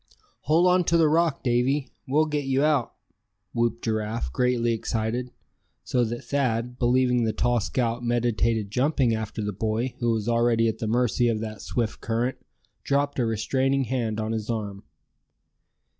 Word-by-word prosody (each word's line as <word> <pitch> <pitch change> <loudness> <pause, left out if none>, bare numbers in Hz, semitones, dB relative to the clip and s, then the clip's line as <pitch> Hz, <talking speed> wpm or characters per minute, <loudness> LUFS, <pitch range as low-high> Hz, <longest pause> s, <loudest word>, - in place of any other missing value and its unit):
"Hold 165 +3 +5
on 180 0 +4
to 170 - +3
the 160 -2 +5
rock, 160 -1 +1
Davy! 130 +2 +1 0.2
We'll 150 +4 +3
get 150 -2 -2
you 135 +1 +1
out!" 150 -5 +1 0.6
whooped 120 -1 0
Giraffe, 110 - -2
greatly 120 -2 +1
excited, 115 +2 -2 0.5
so 125 - +1
that 120 +1 -5
Thad, 125 -3 -1
believing 125 0 +3
the 110 -1 0
tall 120 -1 +1
scout 120 +2 -1
meditated 115 -3 0
jumping 130 0 +2
after 110 -1 -3
the 105 0 -2
boy 110 +5 -1
who 120 - 0
was 110 -1 0
already 115 -1 +3
at 110 - -2
the 110 - -2
mercy 120 +1 +2
of 115 -2 0
that 110 -2 -6
swift 115 -2 -2
current, 120 +3 -1 0.4
dropped 140 0 0
a 120 - +2
restraining 130 +5 +1
hand 115 -4 -2
on 110 0 -2
his 110 -1 -3
arm. 105 -4 -3
120 Hz, 160 wpm, -25 LUFS, 110-130 Hz, 0.6 s, Hold